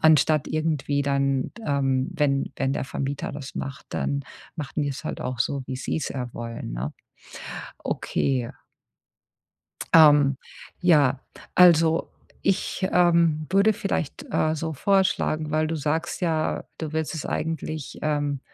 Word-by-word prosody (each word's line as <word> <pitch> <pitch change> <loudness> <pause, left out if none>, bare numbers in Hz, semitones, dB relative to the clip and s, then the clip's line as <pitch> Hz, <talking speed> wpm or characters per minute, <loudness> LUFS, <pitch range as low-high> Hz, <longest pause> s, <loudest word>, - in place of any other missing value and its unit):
anstatt 155 -1 +4
irgendwie 155 -2 0
dann 140 -1 0
ähm, 135 -2 +1
wenn 140 -4 0
wenn 135 0 0
der - - -2
Vermieter 140 +1 -3
das 140 -2 -8
macht, 140 +1 -6
dann 140 0 -1 0.3
machen 150 0 -3
die 145 - -1
es 135 - -6
halt - - -4
auch 125 -1 -3
so, 140 +2 0
wie 130 - -4
sie 130 - -2
es - - -3
ja 125 -3 -5
wollen, 115 - -6
ne? 60 +5 -3 0.9
Okay. 125 -4 -1 1.4
Ähm, 145 -4 +7 0.4
ja, 145 -7 +4 0.3
also 165 -2 +5 0.3
ich, 185 0 0
ähm, 170 -3 +3
würde 200 +3 +5
vielleicht, 195 -7 -3
äh, 155 0 +1
so 160 +1 -3
vorschlagen, 160 -3 +1
weil 155 +1 +1
du 165 - -2
sagst 155 +3 -2
ja, 160 -3 0
du 160 -1 -4
willst 160 +1 -2
es 155 - -4
eigentlich, 155 -2 -3
ähm 145 -2 0
150 Hz, 140 wpm, -25 LUFS, 135-160 Hz, 1.4 s, Ähm